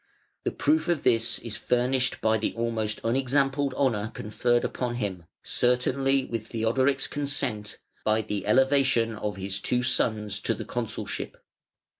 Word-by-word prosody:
The -, -, +1 dB
proof 315 Hz, -5 st, +1 dB
of 170 Hz, -4 st, 0 dB
this 115 Hz, -1 st, +3 dB
is 115 Hz, -3 st, -4 dB
furnished 125 Hz, +1 st, 0 dB
by 110 Hz, 0 st, +2 dB
the 110 Hz, -, -2 dB
almost 115 Hz, -2 st, -1 dB
unexampled 135 Hz, +3 st, +1 dB
honour 110 Hz, -6 st, 0 dB
conferred 120 Hz, +3 st, 0 dB
upon 125 Hz, -1 st, -2 dB
him 95 Hz, -7 st, -4 dB, 0.2 s
certainly 130 Hz, +2 st, +2 dB
with 115 Hz, -2 st, -5 dB
Theodoric's 130 Hz, +5 st, +1 dB
consent 140 Hz, -7 st, -2 dB, 0.3 s
by 110 Hz, +1 st, +2 dB
the 105 Hz, -2 st, -4 dB
elevation 130 Hz, -1 st, +3 dB
of 105 Hz, -1 st, -3 dB
his 95 Hz, 0 st, -2 dB
two 125 Hz, +5 st, +1 dB
sons 105 Hz, -5 st, +1 dB
to -, -, -1 dB
the -, -, -7 dB
consulship. -, -, -4 dB
120 Hz, 140 wpm, -27 LUFS, 110-135 Hz, 0.3 s, this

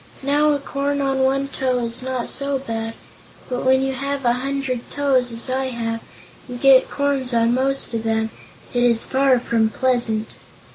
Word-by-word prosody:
Now, 295 Hz, +2 st, +3 dB
a -, -, +1 dB
corn 280 Hz, 0 st, -2 dB
on 270 Hz, -1 st, 0 dB
one 270 Hz, +1 st, +1 dB
toe 260 Hz, -2 st, -1 dB
is 230 Hz, +2 st, +2 dB
not 255 Hz, -2 st, -3 dB
so 280 Hz, +1 st, 0 dB
bad, 225 Hz, -3 st, -4 dB, 0.5 s
but 250 Hz, -1 st, -2 dB
when 260 Hz, 0 st, +3 dB
you 270 Hz, 0 st, -1 dB
have 275 Hz, +1 st, -3 dB
a 240 Hz, -, +4 dB
hundred 260 Hz, -1 st, -3 dB
toes 265 Hz, -4 st, +1 dB
as 230 Hz, +2 st, -2 dB
I 260 Hz, +1 st, -1 dB
have 230 Hz, -2 st, -3 dB, 0.5 s
and 245 Hz, -1 st, -7 dB
get 270 Hz, -1 st, +6 dB
corns 275 Hz, -3 st, -1 dB
on 230 Hz, +1 st, +3 dB
most 270 Hz, 0 st, 0 dB
of 225 Hz, -, -1 dB
them, 220 Hz, 0 st, -1 dB, 0.4 s
it 245 Hz, -, +1 dB
is 235 Hz, -2 st, +3 dB
far 270 Hz, -1 st, +3 dB
from 230 Hz, -2 st, +1 dB
pleasant. 225 Hz, -2 st, 0 dB
260 Hz, 180 wpm, -21 LUFS, 235-275 Hz, 0.5 s, get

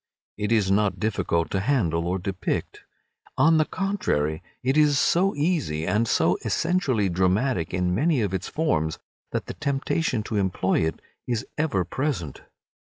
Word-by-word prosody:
It 105 Hz, +1 st, -2 dB
is 105 Hz, -4 st, +3 dB
not 100 Hz, -2 st, +2 dB
difficult 90 Hz, -5 st, 0 dB
to 95 Hz, -, 0 dB
handle 90 Hz, -, +1 dB
or 90 Hz, +2 st, 0 dB
depict. 95 Hz, 0 st, -3 dB, 0.6 s
On 160 Hz, +1 st, +5 dB
the 155 Hz, -, +3 dB
contrary, 80 Hz, -, -1 dB, 0.2 s
it 130 Hz, +2 st, +1 dB
is 150 Hz, -2 st, +4 dB
so 185 Hz, +6 st, +2 dB
easy, 145 Hz, -, 0 dB
and 115 Hz, +3 st, +1 dB
so -, -, +2 dB
essentially 140 Hz, -, +1 dB
dramatic 95 Hz, +2 st, +1 dB
in 90 Hz, 0 st, 0 dB
many 145 Hz, -, +2 dB
of 100 Hz, -2 st, -2 dB
its 95 Hz, -, -2 dB
forms, 80 Hz, -, 0 dB, 0.3 s
that -, -, -2 dB
the -, -, -6 dB
temptation 140 Hz, -3 st, -1 dB
to 105 Hz, 0 st, -3 dB
employ 95 Hz, -1 st, +1 dB
it 80 Hz, -, -4 dB, 0.3 s
is 120 Hz, 0 st, -1 dB
ever 150 Hz, -, 0 dB
present. 100 Hz, -, -3 dB
105 Hz, 150 wpm, -25 LUFS, 90-145 Hz, 0.6 s, On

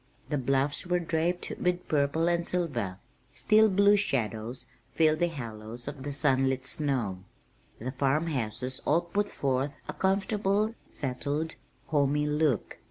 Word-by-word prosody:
The 150 Hz, -, 0 dB
bluffs 135 Hz, +5 st, 0 dB
were 180 Hz, 0 st, +2 dB
draped 170 Hz, +1 st, -1 dB
with 180 Hz, 0 st, 0 dB
purple 150 Hz, +3 st, +2 dB
and 170 Hz, 0 st, +2 dB
silver. 130 Hz, -, -2 dB, 0.4 s
Steel 220 Hz, 0 st, +5 dB
blue 200 Hz, +1 st, +5 dB
shadows 120 Hz, -, -1 dB, 0.3 s
filled 155 Hz, -1 st, +4 dB
the 175 Hz, -, +3 dB
hollows 115 Hz, -5 st, -7 dB
of 145 Hz, -1 st, -6 dB
the 145 Hz, +2 st, -3 dB
sunlit 135 Hz, -2 st, +2 dB
snow. 135 Hz, -, -1 dB, 0.6 s
The 125 Hz, +4 st, -4 dB
farmhouses 130 Hz, -3 st, -1 dB
all 160 Hz, +4 st, +4 dB
put 200 Hz, +4 st, -1 dB
forth 135 Hz, +1 st, -1 dB
a -, -, -4 dB
comfortable, 200 Hz, +2 st, +1 dB, 0.2 s
settled, 145 Hz, +4 st, -2 dB, 0.3 s
homey 145 Hz, 0 st, +2 dB
look. 150 Hz, -5 st, 0 dB
145 Hz, 130 wpm, -29 LUFS, 130-170 Hz, 0.6 s, Steel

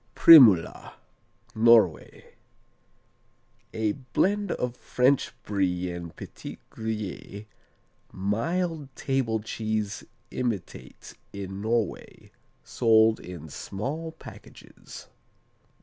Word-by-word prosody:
Primula 120 Hz, -, +7 dB, 0.6 s
Norway 110 Hz, -6 st, +2 dB, 1.4 s
A 110 Hz, -1 st, -1 dB
blend 190 Hz, -, -1 dB
of 125 Hz, -1 st, -3 dB
French 125 Hz, +2 st, +1 dB
Brie 90 Hz, -3 st, -1 dB
and 85 Hz, -1 st, -8 dB
Petit -, -, -10 dB
Gruyère, 105 Hz, -2 st, -6 dB, 0.7 s
mild 145 Hz, -, -3 dB
table 125 Hz, -5 st, -1 dB
cheese 110 Hz, -2 st, -3 dB, 0.3 s
imitate 115 Hz, -7 st, -5 dB, 0.2 s
in 95 Hz, 0 st, -7 dB
Norway, 110 Hz, -2 st, -3 dB, 0.3 s
sold 110 Hz, -1 st, +3 dB
in 85 Hz, -3 st, -10 dB
small 140 Hz, -, -6 dB
packages. 160 Hz, -, -13 dB
110 Hz, 75 wpm, -26 LUFS, 100-130 Hz, 1.4 s, Primula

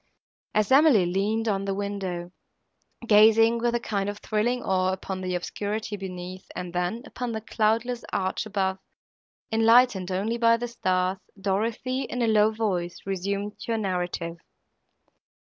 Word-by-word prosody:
As 210 Hz, +1 st, +2 dB
Emily 270 Hz, -, +6 dB
leaned 205 Hz, +5 st, 0 dB
on 195 Hz, -2 st, 0 dB
the 195 Hz, -1 st, -1 dB
window, 190 Hz, -3 st, -4 dB, 0.7 s
gazing 225 Hz, +2 st, +6 dB
with 240 Hz, 0 st, +1 dB
a -, -, +1 dB
kind 200 Hz, -4 st, -2 dB
of 205 Hz, -, -5 dB
thrilling 230 Hz, +4 st, -1 dB
awe 185 Hz, -1 st, +1 dB
upon 190 Hz, 0 st, -4 dB
the 185 Hz, -1 st, -2 dB
obscurity 205 Hz, +4 st, -3 dB
beneath, 185 Hz, -1 st, -7 dB
and 180 Hz, -1 st, -5 dB
then 180 Hz, +7 st, -2 dB
upon 245 Hz, -4 st, -5 dB
the 220 Hz, -, -3 dB
cloudless 225 Hz, +2 st, 0 dB
arch 190 Hz, +3 st, -1 dB
above, 190 Hz, -2 st, -1 dB, 0.7 s
enlightened 225 Hz, -4 st, +4 dB
only 215 Hz, +6 st, -1 dB
by 230 Hz, 0 st, +5 dB
the 240 Hz, +1 st, -3 dB
stars, 185 Hz, -4 st, 0 dB, 0.2 s
Dorothée, 225 Hz, +7 st, -1 dB
in 245 Hz, -1 st, -2 dB
a -, -, +2 dB
low 215 Hz, -1 st, +4 dB
voice, 190 Hz, -6 st, -2 dB
resumed 200 Hz, +2 st, -3 dB
her 230 Hz, -1 st, 0 dB
narrative. 180 Hz, -4 st, -2 dB
205 Hz, 145 wpm, -26 LUFS, 185-225 Hz, 0.7 s, Emily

